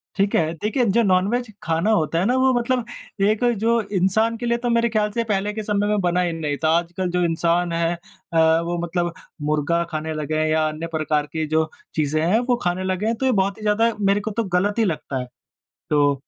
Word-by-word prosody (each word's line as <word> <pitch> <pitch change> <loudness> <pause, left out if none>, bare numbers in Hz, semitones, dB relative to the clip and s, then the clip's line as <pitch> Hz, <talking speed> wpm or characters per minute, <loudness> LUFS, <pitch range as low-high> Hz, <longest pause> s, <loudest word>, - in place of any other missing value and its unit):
ठीक 200 0 +1
है? 160 0 +1
देखिए 215 - 0
जो 230 +3 +3
नॉनवेज 205 +5 +1 0.2
खाना 165 +6 +1
होता 165 -5 +1
है 180 - +1
ना, 245 +4 +2
वो 260 0 +3
मतलब 245 0 0 0.4
एक 215 +3 +1
अ, 245 - +4
जो 230 +1 +1
इंसान 210 +3 +1
के 240 - -5
लिए 235 0 +1
तो 240 0 -2
मेरे 235 0 +2
ख़्याल 210 -2 0
से 235 +2 -1
पहले 210 -1 -1
के 215 0 -4
समय 205 0 0
में 210 -1 +1
बना 180 0 +1
ही 175 -2 0
नहीं 150 -3 -3
था 155 - +3
आजकल 175 +1 -4
जो 180 0 +1
इंसान 170 +1 +1
है 165 0 +1
अ, - - -13 0.6
वो 170 +1 -2
मतलब 175 0 -1 0.4
मुर्ग़ा 155 +3 +1
खाने 155 0 -3
लगे 155 0 -3
हैं 155 - +1
या 155 0 +2
अन्य 155 +2 -4
प्रकार 155 -2 -1
की 160 -1 -1
जो 155 0 +1 0.3
चीज़ें 155 0 0
हैं 210 +6 +3
वो 245 - +4
खाने 180 +1 -1
लगे 185 +2 -1
हैं 225 +1 +1
तो 265 - -3
ये 260 - +3
बहुत 195 -1 +1
ही 220 - -13
ज़्यादा, 215 +2 +2
मेरे 200 0 +2
को 220 - -4
तो 230 +2 -1
गलत 195 +3 0
ही 225 - +3
लगता 150 -6 -3
है। 125 - -5 0.6
तो 145 -1 +3
185 Hz, 235 wpm, -22 LUFS, 165-220 Hz, 0.6 s, अ